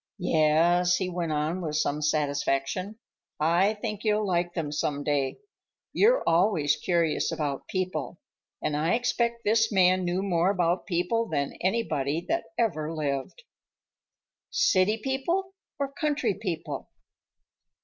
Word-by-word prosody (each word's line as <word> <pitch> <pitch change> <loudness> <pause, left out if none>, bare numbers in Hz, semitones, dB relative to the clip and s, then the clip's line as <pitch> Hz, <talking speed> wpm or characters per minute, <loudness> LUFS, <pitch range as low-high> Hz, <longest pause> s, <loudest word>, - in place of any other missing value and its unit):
"Yes," 175 +1 +3
he 185 0 -1
went 175 -2 -2
on 155 +4 -1
with 155 -3 -3
some 150 -1 0
satisfaction, 150 +5 -1 0.4
"I 175 +7 +3
think 210 -1 -5
you'll 215 -1 +1
like 175 -2 0
them 155 -4 -2
some 145 -1 -2
day. 140 -2 0 0.6
You're - - +4
always 165 -4 +3
curious 170 -3 0
about 145 -3 -3
people, 185 -2 -3 0.4
and 150 -1 0
I 160 +7 +2
expect 235 -1 0
this 225 +2 +3
man 185 -1 +4
knew 180 +2 -1
more 180 -2 +2
about 180 -2 0
people 195 +6 0
than 140 -2 -1
anybody 170 -7 0
that 335 +1 0
ever 160 -10 0
lived." 150 - -3 1.1
"City 360 - +3
people 305 - -2 0.2
or 280 -1 -2
country 285 -6 0
people?" 170 -8 -5
180 Hz, 130 wpm, -27 LUFS, 155-215 Hz, 1.1 s, You're